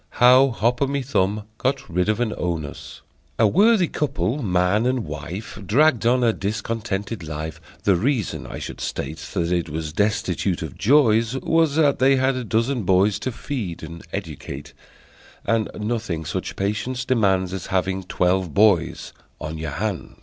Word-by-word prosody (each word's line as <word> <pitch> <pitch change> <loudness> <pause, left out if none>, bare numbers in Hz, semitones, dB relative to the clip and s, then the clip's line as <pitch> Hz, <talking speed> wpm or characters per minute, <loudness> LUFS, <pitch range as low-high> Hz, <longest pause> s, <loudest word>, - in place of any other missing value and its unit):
How 130 +2 +7
Hop 120 +2 0
O' 140 - +3
My 140 0 -1
Thumb 105 -5 0 0.2
Got 135 +1 -1
Rid 90 +4 0
of 105 +1 +1
an 115 -3 0
Onus 80 -5 -5 0.3
A - - +4
worthy 200 - +4
couple, 145 -2 -1
man 95 +2 +2
and 125 -4 0
wife, 80 +9 -7
Dragged 120 - +3
on 125 +1 +3
a 115 -2 +3
discontented 110 0 -3
life: 80 0 -6 0.2
The 100 - +4
reason, 115 +2 -1
I - - -7
should - - -7
state, 80 - -4 0.2
That 85 -2 0
it 85 -2 0
was 75 0 -4
destitute 95 -2 0
of 75 -5 -7
joys, 115 -2 +3
Was 160 +1 +2
that 145 -4 +3
they 135 +1 +5
had 130 0 +2
a 130 - -3
dozen 115 +3 0
boys 95 +2 +3
To 120 +5 -3
feed 110 - -5
and 85 +1 -8
educate, 70 +1 -6 0.7
And 115 -2 +1
nothing 105 -7 -2
such - - -4
patience 105 +6 -2
demands 95 -7 +2
As 95 -3 -5
having 95 0 0
twelve 90 -2 0
boys 100 -5 +2 0.3
on 80 0 -5
your 80 0 -3
hands! 100 +3 -4
105 Hz, 165 wpm, -23 LUFS, 90-125 Hz, 0.7 s, How